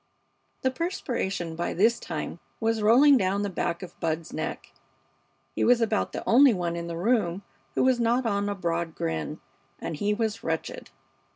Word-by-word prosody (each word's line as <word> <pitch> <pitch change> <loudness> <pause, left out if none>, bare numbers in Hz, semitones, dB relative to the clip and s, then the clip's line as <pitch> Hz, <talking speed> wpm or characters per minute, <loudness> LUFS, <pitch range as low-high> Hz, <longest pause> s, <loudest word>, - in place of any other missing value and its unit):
The 260 - +2
perspiration 235 - -3
by 170 +1 -2
this 225 +5 +3
time 165 0 -5 0.2
was 225 -1 0
rolling 265 +7 +6
down 195 -1 0
the 200 - -2
back 170 -1 -2
of 175 -1 -11
Bud's 160 0 -2
neck. - - -5 0.8
He - - -1
was 245 0 +5
about 220 -2 0
the - - -6
only 255 0 +6
one 175 -2 -2
in 170 0 -4
the 170 -1 -4
room 195 -2 +1 0.3
who - - +2
was 255 -1 +3
not 240 +2 +2
on 205 -2 0
a 205 - -2
broad 170 -3 -2
grin, 80 -2 -3 0.4
and - - -4
he 205 +7 0
was 225 0 -2
wretched. 160 0 -3
200 Hz, 175 wpm, -27 LUFS, 170-235 Hz, 0.8 s, rolling